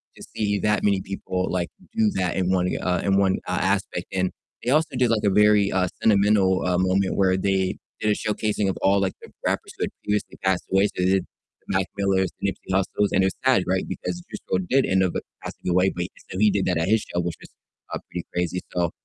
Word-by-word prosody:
to - - -15
see 105 -2 0
that 105 +1 +1
many 100 -2 +2
people, 95 -1 -3
like, 90 -1 -1 0.3
do 220 -2 +4
that 90 -2 0
in 95 -1 +1
one, 90 -1 +2
uh 90 -1 0
in 95 -1 +2
one, 95 -1 +3
uh, - - -1
aspect. - - 0
And 95 -1 0 0.3
they 125 - 0
also 155 -2 +2
did 125 -2 +2
like 110 - +1
a - - +5
very, 105 0 +4
uh, 95 -1 +2
sentimental, 100 -3 +3
uh, 90 -1 +2
moment 95 +1 +1
where 95 -1 +3
they 95 -1 0 0.2
did 105 - +1
a - - +2
showcasing 105 -2 -1
of 95 - -2
all, 100 +1 +4
like, 95 -1 0
the - - -12 0.2
rappers - - -1
who - - -2
had - - -7
previously 105 0 -2
passed 95 -1 +1
away, 95 +1 +4
so, 90 - -3
they - - +2
did 95 -2 +2
the 95 - -6
Mac 95 - 0
Millers, 95 -2 +2
the - - 0
Nipsey 95 0 -10
Hussles, 100 +2 +1
and 95 - +4
it 95 - +4
was - - -3
sad, 125 -8 +4
right, 95 0 +1
because 90 -1 -4
Juice - - -6
WRLD 95 -1 0
did 135 +1 +4
end 95 0 +2
up 90 - 0 0.3
passing - - -8
away, 90 +2 +3
but 90 0 -2 0.3
so 95 - -5
he 105 -1 +5
did 100 -1 0
that 90 -2 +1
at 80 +3 0
his 110 +2 +4
show, 90 - -4
which 85 -1 -3
was, - - -12 0.4
uh, - - 0
pretty 90 - -4
crazy. 90 +1 -1
So, 85 -2 0
95 Hz, 245 wpm, -24 LUFS, 90-105 Hz, 0.4 s, a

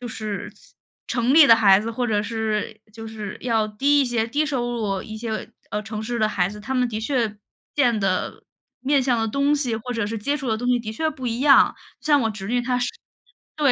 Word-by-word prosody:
就 245 - -6
是 215 -2 -5 0.6
城 245 +2 +1
里 310 -2 +9
的 230 - +9
孩 200 -4 +6
子， 220 +3 -3
或 245 +2 -2
者 210 -3 +1
是 220 -1 -3
就 225 -1 -8
是 215 -3 -7
要 225 -3 +1
低 280 +7 +2
一 - - +3
些， 235 -2 0
低 295 +6 0
收 245 -4 -2
入 205 -5 -2
一 220 0 -8
些， 220 -1 -4 0.2
呃， 210 +1 -2
城 215 0 -6
市 240 +2 -3
的 215 - +3
孩 180 -4 +1
子， 210 +2 -9
他 240 +6 -5
们 250 -1 +1
的 215 -2 -4
确 225 -2 -1 0.4
见 245 -6 +2
的、 190 -2 -1 0.4
面 275 +2 +2
向 250 -2 +1
的 225 - 0
东 280 +5 +2
西， 250 -6 -1
或 245 +3 -5
者 230 -3 -1
是 225 +2 -4
接 280 +8 -1
触 275 -4 -5
的 220 - +1
东 245 - -4
西 250 -1 +3
的 225 -2 -6
确 315 +8 -1
不 260 -4 -7
一 235 +1 -2
样。 280 0 +6 1.8
像 300 - 0
我 - - +6
侄 - - +7
230 Hz, 235 characters per minute, -23 LUFS, 215-255 Hz, 1.8 s, 里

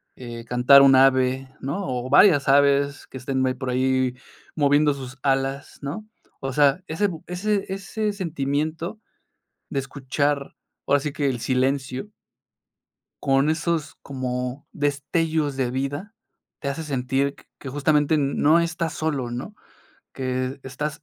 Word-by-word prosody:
eh, 120 -2 -8
cantar 125 +3 +6
un 135 -1 +7
ave, 130 0 +3
¿no?, 175 +9 -3
o 125 -1 -3
varias 145 0 +6
aves 140 0 +3
que - - -9
estén 130 0 -2
me 130 -1 +1
por 125 0 -4
ahí 130 0 +1 0.4
moviendo 145 0 +3
sus 130 -1 -8
alas, 135 0 -1
¿no? 180 +10 -5 0.3
O 135 -1 -4
sea, 145 +5 +3
ese 190 +6 0
bu 165 -5 -7
ese 195 +3 -1
ese 205 +2 -2
sentimiento 160 +1 -2 0.7
de 140 - -1
escuchar, 140 +1 -2 0.3
ahora 145 +1 +4
sí 145 +1 -4
que 145 -1 0
el 125 -2 -3
silencio 130 - -1 1.1
con 135 +2 +3
esos 160 -1 -1
como 125 0 -4
destellos 145 +1 0
de 130 -2 0
vida, 145 - -3 0.5
te 140 - -3
hace 155 +4 -4
sentir 135 -1 -1
q - - -19 0.2
que 135 - -7
justamente 145 +2 +2
n 140 -2 0
no 155 +3 +5
estás 170 -1 -1
solo, 140 -7 -2
¿no?, 130 - -6 0.6
que 130 +1 -3
estás 145 +3 -5
140 Hz, 145 wpm, -24 LUFS, 130-155 Hz, 1.1 s, un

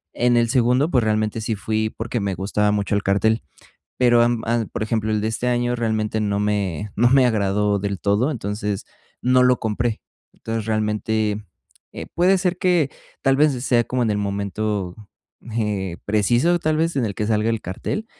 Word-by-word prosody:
En 120 0 +3
el 120 0 +3
segundo, 125 +5 +2
pues, 125 -3 +3
realmente 110 0 0
sí 110 0 -2
fui 110 +1 -1
porque 115 +2 -4
me 100 -2 -2
gustaba 105 +3 0
mucho 105 -1 -1
el 100 - +2
cartel. 110 +3 +2 0.6
Pero, 120 -2 +4
am, 120 -1 +1
a 115 0 0
por 110 - -4
ejemplo, 110 0 -1
el 105 -1 0
de 110 - 0
este 115 +2 -3
año 120 0 +1
realmente 110 -2 -1
no 100 -1 0
me 105 -2 -1
no 120 +3 +4
me 135 0 +5
agradó 105 -2 +1
del 100 -1 -3
todo, 105 +8 +1
entonces, 105 -4 -3 0.4
no 125 0 +4
lo 125 -1 +3
compré. 110 +1 -2 0.3
Entonces, 115 -1 -4
realmente, 110 -1 -1 0.5
eh, - - -7
puede 185 +3 +3
ser 180 -1 -1
que 175 -6 +2 0.3
tal 135 0 +2
vez 150 0 +4
sea 120 -3 +3
como 125 -1 -1
en 110 - +1
el 105 - 0
momento, 100 -1 -2 0.6
eh, 100 -5 -2
preciso, 120 - +2
tal 155 -1 0
vez, 165 -1 0
en 125 - +1
el 100 -3 -4
que 105 - -2
salga 110 0 +1
el 115 -1 -1
cartel, 95 - -4
110 Hz, 190 wpm, -22 LUFS, 105-120 Hz, 0.6 s, me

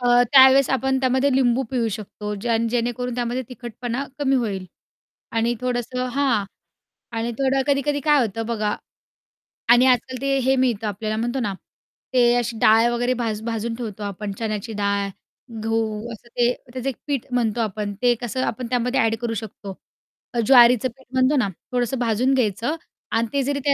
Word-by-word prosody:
अ, 245 0 +5
त्यावेळेस 265 0 +7
आपण 265 0 +1
त्यामध्ये 260 +2 +2
लिंबू 255 0 +3
पिळू 240 -3 0
शकतो 210 0 -5
ज्याण 230 0 +1
जेणेकरून 245 +1 -2
त्यामध्ये 245 +1 -2
तिखटपणा 245 +2 -5
कमी 270 -2 +2
होईल 200 -7 -2 0.7
आणि 230 +1 +1
थोडंसं 250 0 -2
हां 265 -7 +2 0.7
आणि 235 +1 -1
थोडं 270 0 +2
कधी-कधी 285 +1 +1
काय 295 -1 +5
होतं 225 +2 -4
बघा 215 -3 -1 0.9
आणि 240 +2 +7
आजकाल 255 +1 +1
ते 275 0 +1
हे 265 - +4
मिळतं 235 -5 0
आपल्याला 215 +2 -3
म्हणतो 240 +3 -1
ना 210 -5 -1 0.6
ते 240 -1 +5
अशी 240 -1 -1
डाळ 225 +2 +5
वगैरे 245 +1 0
भाज 220 -2 -2
भाजून 230 0 -3
ठेवतो 215 -3 -6
आपण 200 0 -4
चण्याची 220 -1 -3
डाळ, 200 -1 0 0.6
गहू, 225 0 -2
असं 225 +2 -13
ते 240 +1 +1 0.2
त्याचं 255 +1 -2
एक 260 - -5
पीठ 280 -4 -1
म्हणतो 235 -2 0
आपण 210 -1 -3
ते 245 -1 +4
कसं 250 +2 -2
आपण 240 +2 -3
त्यामध्ये 250 +2 0
अ‍ॅड 225 -2 +2
करू 235 -1 -2
शकतो. 205 -2 -7 0.7
ज्वारीचं 245 -1 +6
पीठ 265 - -20
म्हणतो 260 +2 +3
ना 240 - +2 0.2
थोडंसं 250 +1 -1
भाजून 240 +2 +1
घ्यायचं 240 - 0 0.4
आणि 230 +1 +1
ते 280 -1 +1
जरी 280 +1 -1
त्या 280 - +4
240 Hz, 165 wpm, -22 LUFS, 220-260 Hz, 0.9 s, त्यावेळेस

